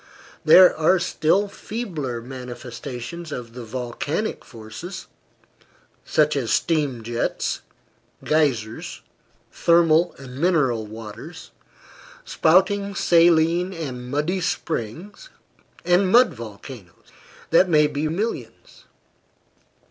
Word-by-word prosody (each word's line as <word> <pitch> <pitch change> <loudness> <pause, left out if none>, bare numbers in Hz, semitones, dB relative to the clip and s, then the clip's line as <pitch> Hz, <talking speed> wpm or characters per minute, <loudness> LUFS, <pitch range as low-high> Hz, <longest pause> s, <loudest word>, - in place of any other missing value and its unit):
There 185 -1 +8
are 160 +4 +3
still 185 +2 +1
feebler 165 - -5
manifestations 125 +4 -8
of 120 -4 -7
the 125 0 -8
volcanic 130 - -4
forces 125 - -9 1.0
such 150 -1 +2
as 130 -5 -1
steam 145 -8 0
jets, 120 +1 -2 0.6
geysers, 130 -8 -1 0.5
thermal 170 0 +3
and 130 -1 -10
mineral 135 -11 +1
waters, 110 -1 -10 0.7
spouting 200 +4 +2
saline 170 +1 +3
and 130 -7 -6
muddy 150 +7 -1
springs, 170 - -4 0.6
and 180 +2 +3
mud 245 +3 +6
volcanoes 105 -4 -11 0.4
that 180 +3 +5
may 150 -2 +5
be 150 +1 -2
reckoned 160 +2 -3
by 210 - +1
millions. 230 - -7
155 Hz, 95 wpm, -23 LUFS, 125-175 Hz, 1.0 s, There